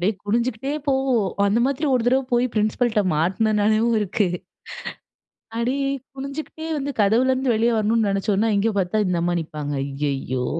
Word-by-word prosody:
அப்டியே 195 +5 +2
குனிஞ்சுகிட்டே 235 +4 -1 0.2
போவோம் 265 -7 +2 0.2
அந்த 205 +3 +2
மாதிரி 280 +3 -1
ஒரு 250 - +2
தடவ 260 +2 +3
போய் 240 +1 +3
பிரின்சிபல்ட்ட 215 +1 +1
மாட்டுனனாலையும் 215 +6 +2
இருக்கு. 205 0 0 1.3
அடிலயே 270 +4 0 0.3
குனிஞ்சுகிட்டே 290 +4 -6
வந்து 285 +1 -3
கதவுல 230 +6 +3
இருந்து 260 -1 +1
வெளிய 230 +2 +2
வரணும்னு 220 0 +2
நெனைச்சோன்னா, 200 +2 +1
இங்கே 220 +3 +1
பார்த்தா 205 +3 +1
இந்த 180 -1 0
அம்மா 175 +1 +1
நிப்பாங்க 150 -2 -5
ஐயயோ! 135 -2 -2
220 Hz, 140 wpm, -22 LUFS, 195-255 Hz, 1.3 s, தடவ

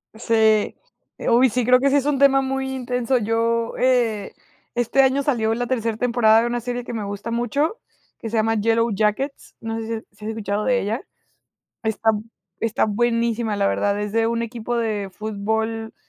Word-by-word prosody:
Sí. 220 -2 +2 0.4
Eh, - - -2
uy, 250 +2 +5
sí, 245 +1 -1
creo 250 0 +6
que 275 +1 +3
sí 280 - +2
es 280 - +2
un 290 -2 +1
tema 270 -1 +5
muy 265 0 -2
intenso. 250 0 0
Yo 230 +1 0
eh, 235 -5 +1 0.4
este 240 +3 +3
año 270 +1 +2
salió 225 -6 +1
la 245 +1 -2
tercer 230 -3 -1
temporada 230 -2 +4
de 240 - 0
una 240 0 -1
serie 245 +1 -4
que 240 - -7
me 220 -3 -3
gusta 205 +3 -5
mucho, 280 - -1 0.4
que 225 - -5
se 225 - -2
llama 225 +1 +2
Yellow 230 +1 +2
Jackets. 215 +7 -1
No 225 0 -4
sé 225 - -5
si 230 - -3
has 220 - -5
si 210 +1 -13
has - - -3
escuchado 210 -1 -2
de 250 -1 +2
ella. 220 - -2 0.8
Está 220 0 +2 0.5
está 225 -1 +1
buenísima, 230 0 0
la 200 -1 +2
verdad. 205 0 0
Es 210 0 -3
de 225 0 +2
un 230 0 0
equipo 235 +1 -4
de 215 -4 -1
fútbol 220 +2 -3
230 Hz, 195 wpm, -22 LUFS, 220-245 Hz, 0.8 s, creo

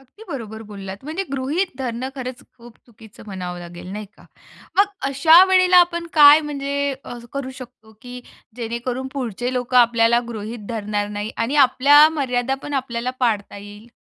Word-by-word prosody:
अगदी 270 - -17
बरोबर 220 -4 -7
बोललात. 195 -2 -8
म्हणजे 320 +6 -3
गृहीत 280 +8 -1
धरणं 250 0 -4
खरंच 255 -1 -7 0.2
खूप 235 -1 -15
चुकीचं 220 -2 -16
म्हणावं 180 -3 -6
लागेल 175 0 -10
नाही 210 0 -6
का? - - -19 0.5
मग 400 - +7 0.2
अशा 315 +6 +6
वेळेला 370 -1 +4
आपण 340 -1 -6
काय 295 0 +8
म्हणजे 280 -1 -3 0.4
करू 275 -2 -4
शकतो, 245 -4 -13
की 250 0 -9 0.4
जेणेकरून 240 +2 -4
पुढचे 245 -2 -4
लोकं 250 0 -2
आपल्याला 235 0 +4
गृहीत 220 -1 -7
धरणार 210 -2 -3
नाही 210 +1 -4
आणि 230 +6 -1
आपल्या 290 +4 +6
मर्यादा 250 -1 -1
पण 290 - -6
आपल्याला 250 -2 -2
पाळता 215 -5 -1
येईल? 205 +2 -12
245 Hz, 155 wpm, -21 LUFS, 220-275 Hz, 0.5 s, काय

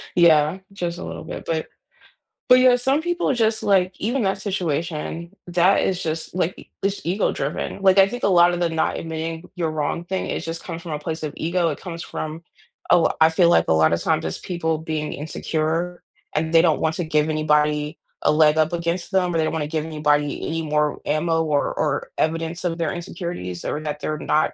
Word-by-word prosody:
Yeah, 160 0 +5
just 175 -3 -3
a - - -7
little - - -6
bit, - - -7
but 160 -1 -2 0.8
but 250 - +8
yeah, 255 -1 +6
some 270 +5 +1
people 350 -2 0
are - - +3
just 220 -2 +1
like 190 -2 +2
even 240 +3 0
that 195 0 0
situation, 170 -2 -3
that 175 +2 +3
is 185 -1 0
just 160 0 -3
like, 180 0 -2
it's 195 +1 -1
ego-driven. 175 -2 -1
Like, 190 0 +6
I 195 - +7
think 245 +5 -6
a - - +4
lotta 175 -1 +5
the 175 -1 +1
not 160 -1 0
admitting 160 +1 -4
you're 170 -3 -1
wrong 155 +2 -2
thing, 190 +1 -2
it - - -2
just 165 0 -5
comes 165 - -6
from 170 -3 -6
a - - -1
place 160 +1 -4
of 150 - -2
ego, 170 +1 +1
it 150 - -4
comes 170 -2 -7
from 155 +1 -5 0.5
a - - +8
l 170 - +3
I 160 - +8
feel 170 +1 +4
like 80 - +4
a - - +4
lotta 80 +1 +4
times - - 0
it's 80 - -3
people 160 -3 -2
being 155 -1 -3
insecure 160 +3 -2 0.3
and 160 +1 0
they 165 - +7
don't 160 -3 +2
want 160 0 +1
to 175 - -2
give 155 -1 +1
anybody 150 0 +1 0.2
a - - +4
leg 155 0 +4
up 160 +2 +2
against 170 +2 -2
them 180 -2 +1
or - - +1
they 160 - +2
don't 155 - -1
wanna 155 -2 -1
give 155 0 -2
anybody 150 -2 0
any 165 0 -2
more 150 -1 0
ammo 165 +2 +1
or 150 -3 0
or 150 -2 -1
evidence 165 +2 -1
of 165 -1 -1
their 165 -2 0
insecurities 170 - -5
or - - -2
that 150 -1 -4
they're 155 +1 -2
not 155 - +1
165 Hz, 215 wpm, -22 LUFS, 155-180 Hz, 0.8 s, but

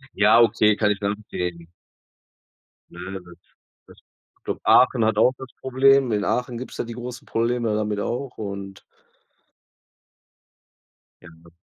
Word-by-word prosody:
Ja, 105 +3 +5
okay, 105 -2 +3
kann 105 0 +1
ich 100 - -2
nachvollziehen. 90 -4 -4 1.2
Na - - -13
ja, 95 - -5
das 85 -1 -15 0.5
das - - -18 0.4
ich - - -52
glaube, - - -4
Aachen 125 -2 +5
hat 110 -1 +1
auch 125 +3 +5
das 130 - -9
Problem. 130 -1 +3
In 105 -1 0
Aachen 125 -1 -2
gibt's 130 - -8
da - - -3
die 120 - -8
großen 120 +1 -8
Probleme 115 -1 -1
damit 105 -1 -2
auch 125 +4 -4
und 100 -2 -7 2.4
Ja. 85 -1 -17
110 Hz, 140 wpm, -23 LUFS, 100-125 Hz, 2.4 s, Ja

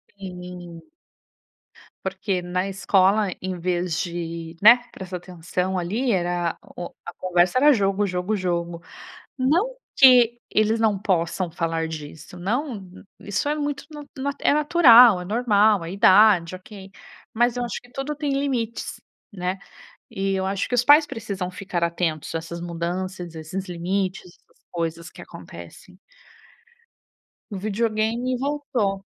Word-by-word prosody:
Sim. 180 -3 -9 1.2
Porque 190 0 -2
na 180 +2 -2
escola 195 +1 +2
em 185 -1 -4
vez 175 -2 -1
de, 170 -2 -5
né, 235 +4 +8
prestar 185 -1 -7
atenção 180 +1 -3
ali, 215 +9 -1
era 175 -3 -1 0.2
o 175 - -5 0.2
a - - -7
conversa 180 +3 +1
era 295 +1 +6
jogo, 200 -1 +1
jogo, 180 +3 -2
jogo. 170 -2 -2 0.6
Não 350 - +1 0.2
que 245 -3 +6
eles 215 +1 +2
não 215 -3 +2
possam 180 -2 -1
falar 165 0 -2
disso, 160 +2 -9
não 225 - -2 0.4
isso 205 +7 -3
é 300 - +1
muito 290 -1 -3 0.3
nat 280 +1 -2
é - - +3
natural, 250 - +7
é - - -6
normal, 210 -3 +2
é 170 - -6
idade, 190 -3 +5
ok. 195 0 -12 0.4
Mas 240 +1 +2
eu 245 - -1
acho 240 - -4
que 245 - -20
tudo 275 +2 -4
tem 290 -2 -2
limites, 260 -5 -2 0.3
né. 185 0 -3 0.5
E 195 0 -1
eu 190 - -1
acho 195 0 -2
que 245 - -2
os 245 0 +2
pais 295 +2 +7
precisam 200 -7 -5
ficar 185 -2 -4
atentos 165 -2 -2
a - - 0
essas 170 +1 -7
mudanças, 175 +1 -4
esses 180 +4 -6
limites, 185 +2 -2
essas 175 - -22
coisas 165 -1 -4
que - - -12
acontecem. - - -12 1.5
O 200 - -4
videogame 225 +4 -1
voltou. 265 -8 -2
195 Hz, 140 wpm, -23 LUFS, 175-230 Hz, 1.5 s, né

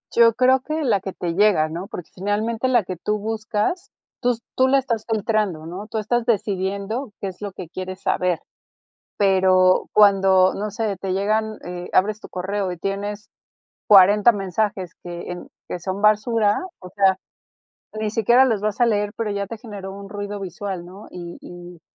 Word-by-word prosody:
Yo 230 -1 +6
creo 260 +1 +4
que 310 +3 -3
la 205 -6 +2
que 190 - -5
te 175 -2 -4
llega, 195 -4 +4
¿no? 170 +5 -6
Porque 180 -6 -8
finalmente 215 +6 -1
la 240 -4 +3
que 185 - -4
tú 210 +5 -2
buscas, 220 - -2 0.3
tus 245 -2 0
tú 260 - +4
la 275 - +5
estás 230 -4 -2
filtrando, 210 -7 0
¿no? 185 +5 -7
Tú 220 - -4
estás 230 +2 0
decidiendo 205 +2 -1
qué 200 - -3
es 185 0 -9
lo 205 -1 -4
que 185 -2 -8
quieres 185 +2 -7
saber. 180 -2 0 0.8
Pero 185 -2 +4
cuando, 195 -2 +5
no 210 +1 -3
sé, 210 -2 -2
te 190 +1 -3
llegan 215 +3 0
eh, 175 0 -6
abres 210 +3 +2
tu - - -11
correo 190 +1 -3
y - - -6
tienes 200 +3 -4 0.6
40 205 +3 +7
mensajes 195 -2 -2
que 175 0 -7
en 175 0 -7 0.2
que - - -4
son 190 +3 -4
basura, 215 0 +3 0.2
o 185 - -10
sea, 190 -1 +3 0.8
ni 215 -1 -1
siquiera 235 +4 +4
los 225 -6 0
vas 215 +2 -2
a 240 - +5
leer, 205 -2 +1
pero 225 -2 -2
ya 200 0 -2
te 230 - -7
generó 205 -4 -8
un 200 +1 -9
ruido 205 0 -5
visual, 190 -1 -5
¿no? 190 +4 -12
Y 175 -1 -8
y 175 -1 -11
205 Hz, 180 wpm, -22 LUFS, 185-220 Hz, 0.8 s, 40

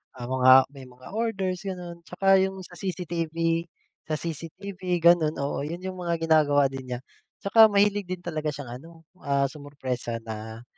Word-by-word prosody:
ang 120 -1 -7
mga 130 0 +6 0.2
may 135 -2 -11
mga 125 0 -15
orders, 195 -5 -1
ganun 180 -3 -6
tsaka 195 +2 +3
yung 190 0 -1
sa - - -15
CCTV, 170 -3 -3 0.7
sa 155 - 0
CCTV, 170 +5 -7 0.2
ganun. 170 -3 +5
Oo, 140 - -2
yun 170 +4 -5
yung 185 -1 -5
mga 170 -1 -1
ginagawa 145 -4 +4
din 135 -1 -7
niya, 120 - -4 0.4
tsaka 220 +2 +7
mahilig 205 -1 +2
din 180 -1 -5
talaga 155 -3 -3
siyang 130 -3 -7
ano, 165 +5 -13 0.3
ah, 140 -2 +1
sumurpresa 130 -5 -5
na, 110 +1 -7
165 Hz, 160 wpm, -26 LUFS, 140-185 Hz, 0.7 s, tsaka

